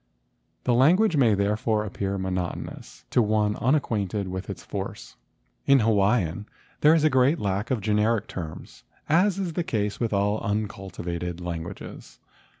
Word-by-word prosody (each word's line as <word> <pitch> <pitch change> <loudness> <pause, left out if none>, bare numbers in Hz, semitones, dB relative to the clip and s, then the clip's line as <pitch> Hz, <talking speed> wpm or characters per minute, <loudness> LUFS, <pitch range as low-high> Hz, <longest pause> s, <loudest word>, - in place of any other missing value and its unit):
The 125 - +2
language 170 - +4
may 120 -7 +4
therefore 105 +2 0
appear 100 -1 -3
monot¬ 95 -2 -2
onous - - -10
to 125 - +4
one 105 -1 +1
unacquainted 105 -8 0
with 95 0 -5
its - - -6
force. - - -6 0.5
In 140 -2 +6
Hawaiian 105 -3 +1 0.3
there 155 +2 +6
is 160 - +2
a 155 - +5
great 130 +5 +4
lack 100 0 -2
of 125 -5 0
generic 105 +1 +1
terms, 80 -8 -8 0.2
as 180 +5 +3
is 185 -4 -2
the 175 - -1
case 105 -8 -2
with 115 -2 -1
all 100 +1 +1
uncultivated 95 -5 -4
languages. 85 -1 -7
105 Hz, 150 wpm, -25 LUFS, 95-125 Hz, 0.5 s, In